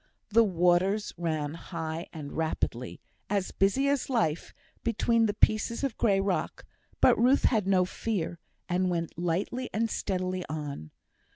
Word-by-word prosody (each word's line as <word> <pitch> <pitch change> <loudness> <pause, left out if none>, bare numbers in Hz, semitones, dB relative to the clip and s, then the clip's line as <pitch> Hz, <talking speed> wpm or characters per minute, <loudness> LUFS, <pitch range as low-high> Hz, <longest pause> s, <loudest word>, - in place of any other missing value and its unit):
The 230 +2 +5
waters 185 +2 +2
ran 155 -4 -2
high 165 -1 -5
and 150 -3 -7
rapidly, 125 -6 -2 0.3
as 200 -2 0
busy 200 +9 +2
as 280 -1 0
life, 170 - 0 0.3
between 230 0 +2
the 205 - -2
pieces 215 +4 +2
of 270 -5 -1
grey 200 -4 +2
rock; 195 -1 -2 0.4
but - - +6
Ruth 255 +4 +4
had 215 -5 +2
no 185 -2 +4
fear, 180 -4 -3 0.3
and 185 +1 +1
went 170 -2 -2
lightly 180 +9 -2
and 225 0 0
steadily 185 -1 -2
on. 145 - -5
185 Hz, 145 wpm, -29 LUFS, 165-220 Hz, 0.4 s, but